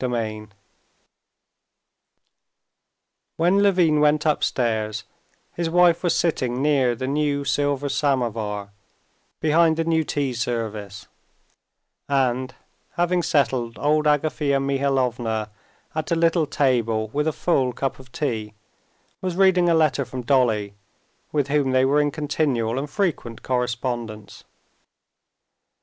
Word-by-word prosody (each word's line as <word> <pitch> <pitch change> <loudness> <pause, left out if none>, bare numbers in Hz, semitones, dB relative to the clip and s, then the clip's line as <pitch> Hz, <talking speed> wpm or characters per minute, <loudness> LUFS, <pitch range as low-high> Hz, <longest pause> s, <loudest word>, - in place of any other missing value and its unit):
Chapter 125 -2 -1
16 110 -2 -4 2.8
When 175 +4 +3
Levin 180 -6 +3
went 150 +1 +3
upstairs, 110 -7 0 0.5
his 170 -1 -2
wife 175 0 +4
was 175 - +1
sitting 130 -7 0
near 135 -4 +2
the 130 - -4
new 140 0 -1
silver 145 0 0
samovar 115 -8 -1 0.7
behind 160 +1 +3
the 165 - +1
new 160 -1 +1
tea 140 -3 -2
service, 110 -4 -4 1.0
and, 130 -2 0 0.4
having 175 +1 +1
settled 130 -7 0
old 150 +1 +1
Agafea 150 -1 +1
Mihalovna 130 -6 -1 0.4
at 155 0 -3
a - - +3
little 165 -1 +2
table 115 -6 0
with 150 +6 -1
a - - +2
full 135 -4 0
cup 135 +2 -3
of 130 -1 -15
tea, 110 -8 -3 0.7
was 185 -2 -3
reading 185 -2 +4
a 165 - +4
letter 155 -3 +2
from 130 0 -7
Dolly, 115 -6 +1 0.6
with 145 -2 0
whom 140 -2 +1
they 130 0 +4
were 145 +2 +3
in 145 - +1
continual 140 -5 -1
and 145 +1 -5
frequent 155 - -2
correspondence. 120 -3 -3
135 Hz, 120 wpm, -23 LUFS, 120-155 Hz, 2.8 s, wife